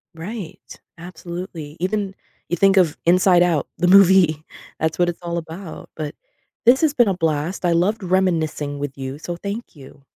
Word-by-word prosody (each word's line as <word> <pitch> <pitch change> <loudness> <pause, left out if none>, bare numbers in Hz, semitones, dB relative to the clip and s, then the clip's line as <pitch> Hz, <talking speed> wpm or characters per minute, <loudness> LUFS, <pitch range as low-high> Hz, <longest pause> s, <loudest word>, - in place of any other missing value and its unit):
Right. 180 +1 -8 0.2
Absolutely. 170 -3 -8
Even 195 +2 -2 0.4
you 175 - -1
think 195 +1 +4
of 175 -5 +3
Inside 180 +1 +5
Out, 170 -5 +1
the 180 - +1
movie, 185 -5 +5 0.4
that's 160 +2 -1
what 175 0 +3
it's 175 - -6
all 170 0 -3
about. 165 +2 -8
But 150 -2 -5 0.5
this 250 +5 +6
has 310 -3 +2
been 240 -6 +4
a 190 - 0
blast, 165 +2 -1
I 175 - +3
loved 195 +6 +1
reminiscing 165 -6 0
with 140 -1 -5
you, 135 +1 -6
so 170 +3 -6
thank 200 +5 -6
you. 140 0 -15
175 Hz, 170 wpm, -21 LUFS, 160-190 Hz, 0.5 s, this